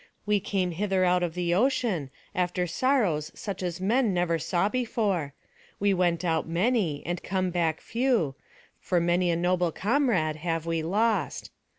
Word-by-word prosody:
We 210 0 +2
came 190 -2 -1
hither 190 +1 +1
out 180 0 +3
of 175 -2 -2
the 175 -1 0
ocean, 210 - +1 0.2
after 180 -1 0
sorrows 180 - +1
such 200 -3 -5
as 175 -1 -3
man 215 +1 +2
never 170 -2 +1
saw 175 +4 +1
before. 205 - -1 0.4
We 200 0 +3
went 175 -1 +1
out 160 -2 0
many, 175 - 0
and 175 +1 -3
come 185 -1 -1
back 165 -3 0
few, 230 - 0 0.5
for 180 - +1
many 175 +1 +2
a 170 - +2
noble 175 0 +1
comrade 200 - +1
have 165 0 -2
we 165 -1 -1
lost. 210 +7 0
180 Hz, 160 wpm, -27 LUFS, 170-205 Hz, 0.5 s, out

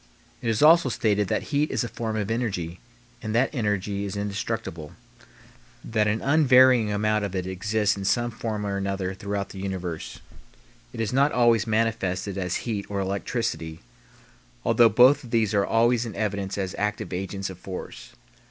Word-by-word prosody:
It 120 - -2
is 115 +4 +1
also 160 -2 +6
stated 105 -3 +1
that 145 - -3
heat 145 +2 +2
is - - -1
a - - -3
form 115 -1 -4
of 105 0 -2
energy, 95 -8 -2 0.4
and 110 0 -3
that 125 +5 +2
energy 105 -4 -1
is 100 0 -4
indestructible, 100 -6 -4 0.9
that 110 -2 0
an 105 +1 -1
unvarying 130 -6 +5
amount 105 +1 +1
of 100 -1 -4
it 90 -1 -2
exists 105 +3 0
in 100 - -6
some 120 +4 +1
form 110 -2 -4
or 100 -1 -2
another 95 -1 -2
throughout 100 +1 -4
the 95 - -9
universe. 90 -4 -5 0.7
It - - -5
is 110 0 -2
not 140 +3 +3
always 120 -2 +3
manifested 110 -4 -1
as 90 -2 -2
heat 105 -4 -3
or 100 -1 -2
electricity, 95 -4 -3 0.8
although 120 -1 +5
both 125 +6 +5
of 120 - -11
these 110 -3 +1
are 100 -1 +2
always 115 +1 +3
in 115 -4 -6
evidence 100 -2 -2
as 95 -2 -3
active 105 -2 -2
agents 95 +1 -4
of 90 - -12
force. 95 -1 -8
105 Hz, 170 wpm, -25 LUFS, 95-115 Hz, 0.9 s, also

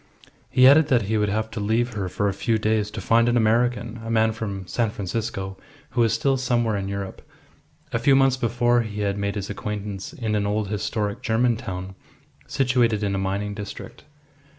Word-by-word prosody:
He 130 0 +6
added 145 +2 +7
that 125 -6 +3
he 110 +2 0
would 105 0 +1
have 110 +2 -2
to - - -5
leave 115 +4 0
her 95 -3 -3
for 100 +3 -1
a 100 - 0
few 110 +4 0
days 110 -1 0
to 110 - -6
find 115 +5 +3
an 120 - +2
American, 115 0 +1
a 115 - -6
man 110 -1 +3
from 100 -4 -5
San 115 +4 0
Francisco, 100 -1 -4 0.3
who 120 - +1
was 115 -2 +3
still 135 +4 +1
somewhere 120 -4 +1
in 100 -1 -3
Europe. 100 -1 -5 0.7
A 115 - +1
few 135 +4 +4
months 135 -1 +4
before 120 -1 +2
he 105 -2 -5
had 100 -1 0
made 100 +1 -2
his 100 0 -4
acquaintance 105 -1 -5
in 110 -4 -3
an 105 -1 +1
old 105 -1 -1
historic 105 0 -2
German 120 +1 +2
town, 95 -5 -6 0.5
situated 120 -5 +1
in 100 -1 0
a 95 - -1
mining 100 +2 -2
district. 105 +3 -8
110 Hz, 200 wpm, -24 LUFS, 100-120 Hz, 0.7 s, added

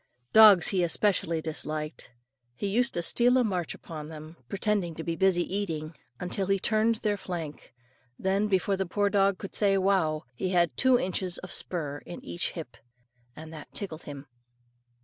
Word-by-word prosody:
Dogs 210 -5 +8
he 190 -2 +1
especially 170 -2 +1
disliked. 155 -1 -4 0.5
He - - -4
used 240 +6 +1
to 175 - 0
steal 245 +8 +4
a 255 - +4
march 185 -6 -2
upon 155 -3 -8
them, 155 +1 -10
pretend 195 -5 -1
to 160 - -4
be 165 0 -2
busy 185 -1 +3
eating, 160 -6 -3 0.4
till 195 -2 0
he 195 0 +3
turned 220 +3 +2
their 210 -2 -1
flank, 165 -6 -6 0.5
then, 195 +2 +1
before 195 0 +1
the 190 -1 -2
poor 200 +2 0
dog 195 -1 +3
could 195 - -8
say 200 -2 +3
"wow," 185 -5 +1
he 185 +10 -3
had 175 -3 +2
two 260 -1 +4
inches 185 -3 -2
of 185 - -8
spur 150 -5 -3
in 175 - -9
each 175 - -3
hip; 160 -8 -8 0.6
and 160 +1 -10
that 150 -2 -10
tickled 170 -6 -4
him. 140 -1 -8
185 Hz, 170 wpm, -28 LUFS, 160-200 Hz, 0.6 s, Dogs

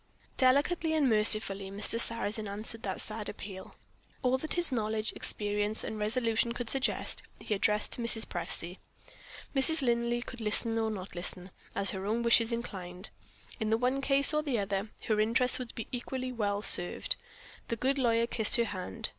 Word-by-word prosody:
Delicately 295 +5 +2
and 295 -3 +2
mercifully 210 -3 +4
Mr. 205 +3 0
Sarrazin 220 -2 +1
answered 215 +3 -4
that 190 -2 -3
sad 215 -1 -4
appeal. 190 -2 -9 0.5
All 255 +1 +2
that 315 - -3
his 350 -4 +2
knowledge, 215 -2 -2
experience 210 +1 -1
and 215 - -5
resolution 230 +1 0
could 240 -1 -2
suggest 270 -1 -1 0.2
he - - -3
addressed 210 +1 0
to - - -3
Mrs. 230 -1 +4
Presty. 175 +1 -3 0.8
Mrs. 285 +3 +5
Linley 240 0 0
could 245 -2 -9
listen 225 +1 +2
or 220 0 0
not 200 -3 -7
listen, 180 +1 0 0.2
as 200 - +1
her 190 0 -5
own 230 +3 -1
wishes 235 0 +4
inclined. 190 -5 -5 0.5
In 220 - -2
the 220 - +2
one 255 +3 0
case 280 +2 +5
or 300 - +2
in 305 - -5
the 265 -5 0
other, 200 0 -2
her 215 -1 0
interests 230 +4 +2
would 250 -2 -7
be 225 - -5
equally 255 +1 -4
well 205 -3 -2
served. 175 -4 +3 0.5
The 230 - -2
good 270 +4 -1
lawyer 230 -2 +2
kissed 225 -2 +3
her 235 - +2
hand. 185 - -5
225 Hz, 175 wpm, -30 LUFS, 205-250 Hz, 0.8 s, Mrs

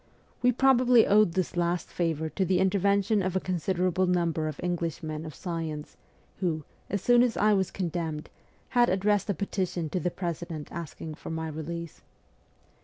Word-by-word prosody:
We 250 - +5
probably 250 -2 +5
owed 205 -4 +4
this 185 -1 -1
last 175 0 0
favour 160 -2 -1
to 190 - -1
the 185 0 +2
intervention 200 +2 +2
of 185 0 -2
a - - +3
considerable 185 +1 0
number 170 -3 +1
of 155 -2 -5
English 170 -2 -2
men 155 0 -4
of 155 - -9
science 160 -3 -5 0.4
who, 165 -5 -1 0.3
as 200 -2 -2
soon 245 0 +6
as 245 -2 +2
I 210 0 +4
was 190 -2 +1
condemned, 165 -4 -3 0.4
had 245 -1 +4
addressed 205 +2 +1
a 200 - +1
petition 180 -3 -2
to 185 - 0
the 180 - 0
President 170 -3 -5
asking 160 -1 -6
for - - -9
my 160 0 -3
release. 165 +1 -6
180 Hz, 170 wpm, -28 LUFS, 160-200 Hz, 0.4 s, soon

